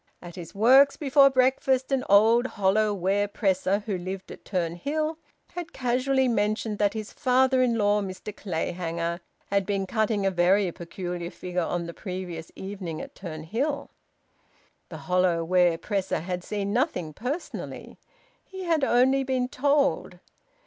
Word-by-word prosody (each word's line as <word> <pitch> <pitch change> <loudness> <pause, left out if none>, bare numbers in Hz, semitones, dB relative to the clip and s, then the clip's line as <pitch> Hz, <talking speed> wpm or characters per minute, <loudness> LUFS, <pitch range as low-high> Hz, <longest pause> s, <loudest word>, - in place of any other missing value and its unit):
At 175 -1 -10
his 170 -1 -9
works 265 +7 +6
before 275 -1 +5
breakfast 260 0 +2
an 265 -2 +1
old 225 +5 +5
hollow 205 +2 +3
ware 200 +1 0
presser, 200 0 0
who 200 -5 -2
lived 190 +1 -6
at - - -11
Turnhill, 280 - -2 0.4
had 350 0 -6
casually 260 +1 +1
mentioned 215 -1 0
that 205 +1 +2
his 215 -1 -6
father 260 -1 +3
in 240 -2 +2
law, 205 -1 +2
Mr 195 +2 -7
Clayhanger, 170 -1 -3 0.3
had 200 -1 +2
been 195 0 -1
cutting 215 0 0
a 195 - +2
very 185 +1 +3
peculiar 175 0 -6
figure 180 0 -4
on 170 +1 -2
the 170 - -7
previous 180 -4 -6
evening 190 -5 -6
at - - -8
Turnhill. 210 - -4 1.0
The - - -7
hollow 180 -2 +2
ware 175 -1 +3
presser 195 -2 -2
had 180 +1 -4
seen 200 0 -3
nothing 225 - -1
personally; 265 - -6 0.4
he 380 -1 -8
had 330 -4 +1
only 265 +2 +3
been 260 -1 0
told. 280 -8 +1
205 Hz, 145 wpm, -26 LUFS, 180-255 Hz, 1.0 s, works